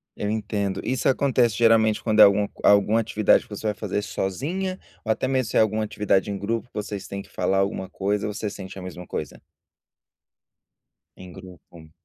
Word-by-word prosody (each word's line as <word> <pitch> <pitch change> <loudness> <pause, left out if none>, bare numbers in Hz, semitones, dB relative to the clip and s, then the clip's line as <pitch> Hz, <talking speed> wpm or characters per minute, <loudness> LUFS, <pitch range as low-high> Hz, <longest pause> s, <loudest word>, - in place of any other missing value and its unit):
Eu 105 - -3
entendo. 105 -2 -2
Isso 130 0 -1
acontece, 125 -4 +2
geralmente, 115 -2 +3
quando 110 -2 +1
é 105 - +12
algum 100 +1 +5 0.2
alguma 105 +2 +5
atividade 110 -1 +3
que - - -26
você 105 +1 -5
vai 105 - +1
fazer 105 0 -3
sozinha, 165 - -3 0.3
ou 110 - +1
até 110 - 0
mesmo 130 -3 0
se - - 0
é - - +6
alguma 110 0 +1
atividade 105 -2 0
em 100 - -3
grupo, 115 +4 -3
vocês 105 -2 -5
têm 100 0 -5
que - - -16
falar 95 0 0
alguma 95 -1 -2
coisa? 100 +2 -1
Você 105 0 -3
sente 95 -1 -9
a 95 - -7
mesma 90 -1 -8
coisa? - - -6 1.7
Em 90 -1 -12
grupo. 90 -3 -14
105 Hz, 185 wpm, -24 LUFS, 95-110 Hz, 1.7 s, é